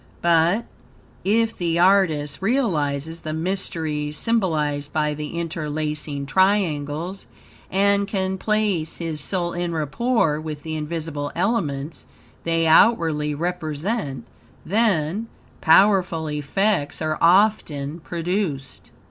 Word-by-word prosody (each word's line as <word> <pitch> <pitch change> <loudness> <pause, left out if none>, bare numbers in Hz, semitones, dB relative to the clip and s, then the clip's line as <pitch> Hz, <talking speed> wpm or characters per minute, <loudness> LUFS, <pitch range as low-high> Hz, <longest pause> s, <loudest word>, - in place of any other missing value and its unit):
But, 170 +6 +3 0.6
if 225 +3 +2
the 170 -2 -1
artist 175 -6 +3
realizes 165 - 0
the 155 -1 -5
mysteries 160 -4 -2
symbolized 155 -10 0
by 150 -1 0
the 150 +2 -6
interlacing 150 -3 -3
triangles, 175 -1 0 0.4
and 200 +1 +2
can 190 -2 -2
place 210 -7 0
his 160 -3 -4
soul 175 +1 -2
en 175 -1 -2
rapport 160 - 0
with 155 -2 -6
the 160 -1 -4
invisible 150 -2 -4
elements 165 -7 -2 0.4
they 165 0 +1
outwardly 160 -5 +4
represent; 160 - -3 0.4
then, 200 -1 +1 0.3
powerful 180 -2 +4
effects 150 +3 0
are 155 0 -1
often 165 -5 +3
produced. 165 -5 -3
165 Hz, 100 wpm, -23 LUFS, 150-195 Hz, 0.6 s, outwardly